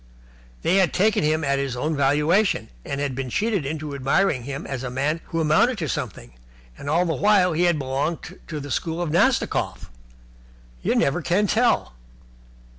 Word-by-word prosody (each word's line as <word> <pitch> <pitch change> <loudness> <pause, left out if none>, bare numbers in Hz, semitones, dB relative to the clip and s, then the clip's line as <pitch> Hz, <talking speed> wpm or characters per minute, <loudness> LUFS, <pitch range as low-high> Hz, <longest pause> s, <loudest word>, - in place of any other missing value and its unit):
They 185 - +3
had 185 -5 +3
taken 205 -1 +2
him 155 +1 +1
at 140 -1 +1
his 135 -3 -2
own 155 +5 -1
valuation, 150 +9 +2
and 140 - -4
had 140 -2 -1
been 130 0 -4
cheated 200 - 0
into 150 0 -4
admiring 140 0 +1
him 140 0 -5
as 135 -3 -4
a 130 - -4
man 145 +6 -1
who 165 - -3
amounted 165 +11 +3
to 160 - -3
something, 115 - -5 0.4
and 140 - -7
all 170 +4 +2
the 165 - 0
while 195 -3 +3
he 170 +3 +2
had 175 -2 +3
belonged 140 +4 -3
to 155 -2 -5
the 145 -1 -7
school 165 +4 -2
of 175 -3 -2
Nastikoff. 205 - +1 0.9
You - - 0
never 150 +6 +1
can 180 +8 +1
tell. 230 - +1
155 Hz, 180 wpm, -23 LUFS, 140-180 Hz, 0.9 s, They